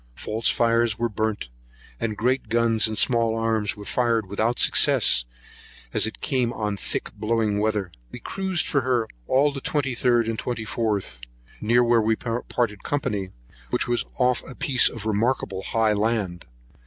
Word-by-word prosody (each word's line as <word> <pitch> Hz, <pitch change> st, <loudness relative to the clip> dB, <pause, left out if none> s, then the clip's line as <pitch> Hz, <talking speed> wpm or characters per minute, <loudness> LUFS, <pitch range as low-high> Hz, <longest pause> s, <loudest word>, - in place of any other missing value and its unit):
False 110 Hz, +1 st, 0 dB
fires 115 Hz, -1 st, +2 dB
were 120 Hz, -, 0 dB
burnt, 110 Hz, -, -3 dB, 0.5 s
and 110 Hz, -2 st, -2 dB
great 125 Hz, +5 st, 0 dB
guns 115 Hz, -1 st, +3 dB
and 110 Hz, -1 st, -3 dB
small 115 Hz, 0 st, +2 dB
arms 110 Hz, -2 st, 0 dB
were 105 Hz, -, -9 dB
fired 115 Hz, -3 st, +1 dB
without 110 Hz, +5 st, -1 dB
success, -, -, +4 dB, 0.7 s
as -, -, +3 dB
it 110 Hz, -, -8 dB
came 125 Hz, -4 st, 0 dB
on 105 Hz, -3 st, -2 dB
thick 100 Hz, -, -4 dB
blowing 110 Hz, -2 st, 0 dB
weather. 105 Hz, -4 st, -1 dB, 0.2 s
We -, -, -7 dB
cruised 190 Hz, -3 st, -1 dB
for 140 Hz, -, +1 dB
her 120 Hz, -3 st, 0 dB, 0.2 s
all 140 Hz, +3 st, +3 dB
the 135 Hz, -1 st, -6 dB
23rd 125 Hz, -5 st, +1 dB
and 115 Hz, -1 st, -2 dB
24th, 110 Hz, -, -2 dB, 0.4 s
near 120 Hz, +3 st, +3 dB
where 120 Hz, -1 st, +3 dB
we 110 Hz, +1 st, +2 dB
parted 115 Hz, -2 st, -2 dB
company, 115 Hz, -10 st, -2 dB, 0.4 s
which -, -, 0 dB
was 120 Hz, 0 st, 0 dB
off 125 Hz, -1 st, +2 dB
a 130 Hz, -, -9 dB
piece 130 Hz, -4 st, +3 dB
of 115 Hz, -3 st, -8 dB
remarkable 110 Hz, -2 st, 0 dB
high 110 Hz, +1 st, +1 dB
land. 105 Hz, -5 st, -1 dB
115 Hz, 155 wpm, -24 LUFS, 105-120 Hz, 0.7 s, success